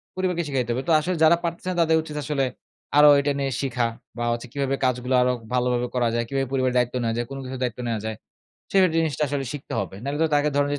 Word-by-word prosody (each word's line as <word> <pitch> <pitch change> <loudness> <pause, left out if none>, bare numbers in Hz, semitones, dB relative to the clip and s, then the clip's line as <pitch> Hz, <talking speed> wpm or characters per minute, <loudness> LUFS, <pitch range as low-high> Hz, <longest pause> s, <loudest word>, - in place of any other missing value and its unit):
পরিবারকে 180 -2 0
শিখাইতে 130 -4 -1
হবে, 130 +3 -2
তো - - +2
আসলে 180 +4 -2
যারা 160 +2 +6
পারতেছে 170 +1 -4
না - - -3
তাদের 160 -1 +4
উচিত 150 -1 -8
আসলে 140 -1 0 0.5
আরো 150 0 +9
এটা 140 +1 +1
নিয়ে 135 -1 -1
শিখা 125 -3 0 0.3
বা 120 - -2
হচ্ছে 120 +1 -3
কিভাবে 135 -1 0
কাজগুলো 125 0 0
আরো 125 0 +3 0.2
ভালোভাবে 125 -1 +1
করা 120 -1 +2
যায়? 120 - +1
কিভাবে 135 +1 -1
পরিবারের 130 -1 +1
দায়িত্ব 125 0 +1
নেয়া 115 -1 0
যায়? 120 - -1
কোন 135 - -6
কিছুর 130 0 -6
দায়িত্ব 125 -1 -3
নেওয়া 115 -2 -2
যায়? 110 0 -3 0.6
সের 195 -1 +5
জিনিসটা 160 -3 0
আসলে 140 0 -2
শিখতে 145 -2 -8
হবে। 95 - -5
নাহলে 140 +3 -3
তো - - +4
তাকে 145 +1 +3
ধরেন 145 0 +2
যে - - -3
135 Hz, 240 wpm, -24 LUFS, 125-150 Hz, 0.6 s, আরো